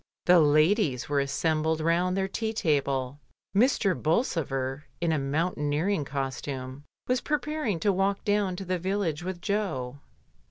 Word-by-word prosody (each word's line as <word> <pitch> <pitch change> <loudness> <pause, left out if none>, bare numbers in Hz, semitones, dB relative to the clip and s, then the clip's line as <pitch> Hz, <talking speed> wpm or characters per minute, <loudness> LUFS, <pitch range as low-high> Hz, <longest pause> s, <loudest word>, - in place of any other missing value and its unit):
The 180 0 +7
ladies 155 - +3
were 145 -1 +1
assembled 155 +3 0
round 175 +3 +1
their 190 0 +1
tea 220 +3 -3
table, 140 - 0 0.4
Mr. 210 -3 +3
Bolsover, 150 - -1
in 170 -1 +1
a 155 - +1
mountaineer 150 +3 0
ing 185 -8 0
costume, 135 0 -5 0.2
was 250 0 +1
preparing 300 - -1
to 200 +1 +3
walk 195 +1 0
down 205 -3 +1
to 195 +1 -6
the 185 0 -1
village 185 -3 -1
with 180 0 -5
Jo. 155 - -2
165 Hz, 145 wpm, -27 LUFS, 145-195 Hz, 0.4 s, The